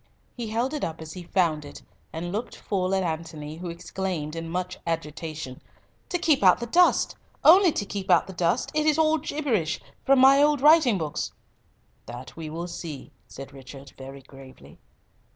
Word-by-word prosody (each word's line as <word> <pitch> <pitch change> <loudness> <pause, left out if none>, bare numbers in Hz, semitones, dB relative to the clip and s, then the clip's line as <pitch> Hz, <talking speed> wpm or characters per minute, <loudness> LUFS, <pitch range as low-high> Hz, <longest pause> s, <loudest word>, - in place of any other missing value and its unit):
He 235 -3 -5
held 235 +6 -1
it 300 - -3
up 160 -1 -3
as 160 0 -8
he 180 - -8
found 170 -4 0
it, 145 - -11 0.3
and 175 +2 -5
looked 220 +5 -4
full 190 -2 -1
at 190 - +1
Antony, 160 -2 -5
who 175 +1 -6
exclaimed 170 -2 -4
in 165 0 -5
much 180 +1 -4
agitation, 155 -4 -5 0.5
"To 355 - 0
keep 315 -5 +2
out 185 -2 +6
the 235 - -3
dust. 350 +10 +3 0.3
Only 360 +2 +7
to 205 - -2
keep 195 -1 -6
out - - +5
the 190 - -9
dust. 175 +6 0
It 305 0 +1
is 305 0 +3
all 315 0 +3
gibberish—from 275 - -1
my 270 +2 +7
old 295 -1 +4
writing 295 -6 +5
books." 155 -4 -3 0.7
"That 120 +2 -9
will 160 0 -6
we - - -3
see," 170 -5 -7 0.2
said 135 +1 -10
Richard 135 0 -12
very 135 +1 -10
gravely. 130 - -15
175 Hz, 175 wpm, -26 LUFS, 155-245 Hz, 0.7 s, Only